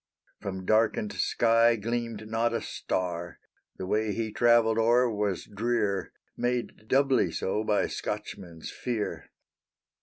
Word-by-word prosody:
From 95 -2 -5
darkened 115 - +2
sky 115 0 +3
gleamed 115 -1 -3
not 115 +1 0
a - - -1
star; 90 -2 -3 0.4
The 95 - -4
way 105 +2 0
he 110 0 -2
travelled 115 -1 +4
o'er 120 +2 +4
was 105 -5 -1
drear, 105 -2 -1 0.2
Made 120 -3 -2
doubly 135 0 +3
so 105 +3 -1
by 105 -1 +2
Scotchmen's 95 -5 -5
fear. 115 -4 -4
110 Hz, 120 wpm, -28 LUFS, 105-120 Hz, 0.4 s, travelled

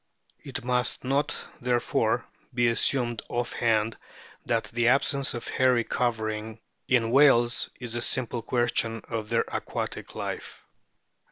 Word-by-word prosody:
It 135 -3 -6
must 125 0 0
not, 140 +3 0 0.2
therefore, 120 -1 +1 0.3
be 120 -1 +2
assumed 120 0 +1
off 120 0 -2
hand 110 -1 +1 0.5
that 115 -1 +1
the 120 0 +2
absence 135 +1 +3
of 120 - -6
hairy 125 -2 +3
covering 110 -2 -2 0.3
in 115 -3 +2
whales 120 -3 +5
is 125 -2 -4
a 120 - -1
simple 120 0 0
question 115 -1 0
of 110 -2 -3
their - - +2
aquatic - - -4
life. - - -6
120 Hz, 125 wpm, -27 LUFS, 115-125 Hz, 0.5 s, whales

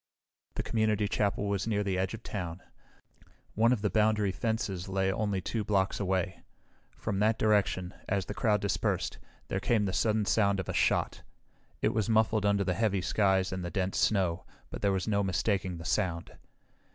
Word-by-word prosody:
The - - -2
community 110 -2 +1
chapel 105 0 0
was 100 +1 -1
near 105 -2 +1
the 100 -2 -1
edge 95 +3 -1
of 115 - -13
town. 90 -3 -5 0.9
One 115 +3 +3
of 115 -5 0
the 105 - +2
boundary 105 -1 +2
fences 100 -3 -2
lay 95 0 +1
only 100 -3 -1
two 110 +4 -2
blocks 100 -1 +1
away. 95 -2 -1 0.6
From 100 -2 -2
that 110 +2 +3
direction, 100 -4 +1 0.2
as 100 -2 0
the - - -5
crowd 105 -1 +1
dispersed, 100 - -1 0.3
there 95 - -1
came 105 +1 +1
the 95 - -2
sudden 110 +1 +1
sound 100 -1 +2
of 95 - -4
a - - -3
shot. - - +1 0.6
It - - +2
was 110 0 0
muffled 110 -1 +3
under 100 -1 +2
the 90 -1 0
heavy 100 -1 +1
skies 95 -1 +1
and 95 -1 -4
the 85 - -3
dense 95 0 -1
snow, 95 -4 +1 0.3
but - - -6
there 100 - +2
was 95 +1 -1
no 100 -2 +2
mistaking 95 -1 0
the 80 - -9
sound. 85 0 -1
100 Hz, 185 wpm, -30 LUFS, 95-110 Hz, 0.9 s, One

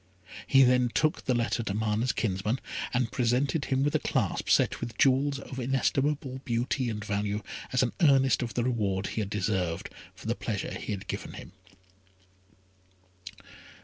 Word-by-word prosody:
He 135 0 +6
then 125 -1 +4
took 155 +7 0
the 130 - +2
letter 120 0 0
to 105 -3 -3
Mana's 110 +3 +1
kinsman, 105 +4 -1 0.3
and 125 -2 0
presented 130 +4 +1
him 130 0 +1
with 145 - +1
a - - +3
clasp - - -1
set - - +3
with 115 - -5
jewels 140 +1 +3
of 135 -1 -8
inestimable 135 +1 0
beauty 120 +2 -1
and 105 -2 -4
value, 105 0 -1 0.3
as 125 0 +3
an 120 - -1
earnest 135 -5 +4
of 115 -4 -4
the 120 - +1
reward 100 -6 0
he 110 - -2
had 100 - -3
deserved, 95 -5 -1 0.2
for - - -14
the - - +1
pleasure - - -3
he - - -5
had 100 -2 -4
given - - -5
him. - - -10
125 Hz, 165 wpm, -28 LUFS, 105-135 Hz, 0.3 s, He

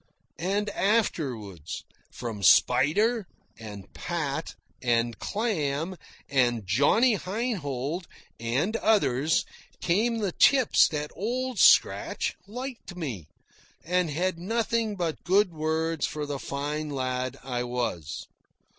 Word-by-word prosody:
And 200 +4 0
afterwards, 130 - -1 0.3
from 115 -4 -6
Spider, 170 - +4 0.3
and 105 -4 -9
Pat, 160 -3 -3 0.3
and 120 -2 +1
Clam, 170 -6 -1 0.3
and 120 -5 +1
Johnny 145 - +4
Heinhold, 175 - -3 0.3
and 130 - 0
others, 160 - +2 0.3
came 220 +7 +1
the 205 -4 -1
tips 260 +5 +5
that 150 -1 -4
Old 250 +4 -2
Scratch - - +4
liked 245 -4 -7
me 125 - -5 0.6
and 180 0 +1
had 170 +3 -1
nothing 225 +2 0
but 170 -4 -3
good 190 -1 +3
words 160 +1 0
for 150 -1 -4
the 145 -1 -4
fine 150 +3 -3
lad 130 -1 -2
I 125 -2 -2
was. 120 - -3
160 Hz, 105 wpm, -27 LUFS, 130-205 Hz, 0.6 s, tips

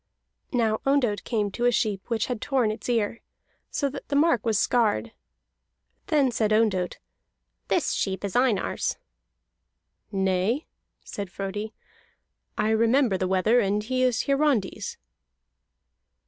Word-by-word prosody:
Now 225 -4 +1
Ondott 265 -7 +1
came 210 -4 -1
to 240 +5 -2
a 245 - +5
sheep 210 -4 -1
which 230 -2 0
had 245 -4 -4
torn 255 -6 +1
its 215 - -6
ear, 230 -1 0 0.5
so 285 - -1
that 275 - -7
the 285 - -2
mark 285 -6 +3
was 225 -3 +1
scarred. 230 0 +1 1.0
Then 285 -5 +3
said 220 -2 0
Ondott: 210 -5 +1 0.7
"This - - +1
sheep 190 +1 -2
is 195 - -5
Einar's." 245 -5 +1 1.1
"Nay," 190 - 0 0.4
said 200 -2 -6
Frodi, 200 +4 -5 0.8
"I 215 - +1
remember 230 0 +3
the 185 0 -1
wether, 190 +6 +3
and 205 -1 +1
he 255 +3 -1
is 250 -3 +2
Hiarandi's." 275 -7 0
225 Hz, 130 wpm, -26 LUFS, 205-250 Hz, 1.1 s, a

